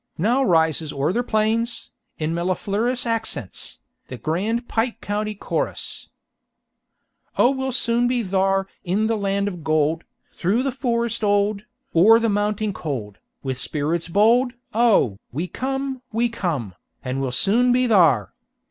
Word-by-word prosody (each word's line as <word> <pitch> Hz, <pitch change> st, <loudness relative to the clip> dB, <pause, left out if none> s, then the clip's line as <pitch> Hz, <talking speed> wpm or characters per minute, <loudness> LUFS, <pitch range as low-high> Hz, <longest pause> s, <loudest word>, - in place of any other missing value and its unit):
Now 240 Hz, +10 st, +2 dB
rises 160 Hz, -, +2 dB
o'er 140 Hz, +5 st, 0 dB
the 240 Hz, -, +1 dB
plains, 230 Hz, +1 st, 0 dB, 0.3 s
in 155 Hz, +1 st, -2 dB
mellifluous 200 Hz, +8 st, 0 dB
accents, 225 Hz, -, -3 dB, 0.3 s
the 130 Hz, -, -7 dB
grand 200 Hz, -, -1 dB
Pike 230 Hz, 0 st, -1 dB
County 210 Hz, 0 st, -3 dB
Chorus: -, -, -3 dB, 1.3 s
"Oh 245 Hz, -, +5 dB
we'll 265 Hz, -1 st, -2 dB
soon 240 Hz, -1 st, +1 dB
be 245 Hz, -1 st, 0 dB
thar 195 Hz, 0 st, +1 dB, 0.2 s
In 200 Hz, +4 st, 0 dB
the 225 Hz, +1 st, +1 dB
land 200 Hz, -1 st, 0 dB
of 175 Hz, -5 st, -5 dB
gold, 155 Hz, +1 st, +1 dB, 0.3 s
Through 205 Hz, +8 st, +1 dB
the 270 Hz, -, 0 dB
forest 235 Hz, -3 st, -1 dB
old, 205 Hz, +1 st, +1 dB, 0.3 s
O'er 210 Hz, +7 st, +7 dB
the 230 Hz, -1 st, +1 dB
mounting 210 Hz, 0 st, 0 dB
cold, 120 Hz, -, -5 dB, 0.2 s
With 130 Hz, -2 st, -3 dB
spirits 160 Hz, +3 st, -2 dB
bold 230 Hz, +7 st, +3 dB, 0.2 s
Oh, 210 Hz, -, +3 dB
we 160 Hz, +8 st, -3 dB
come, 270 Hz, +3 st, -3 dB
we 235 Hz, +2 st, +1 dB
come, 155 Hz, -, -3 dB, 0.3 s
And 130 Hz, +1 st, -2 dB
we'll 130 Hz, -2 st, -1 dB
soon 220 Hz, -, +3 dB
be 250 Hz, +1 st, +3 dB
thar. 155 Hz, -, +4 dB
205 Hz, 140 wpm, -22 LUFS, 165-235 Hz, 1.3 s, O'er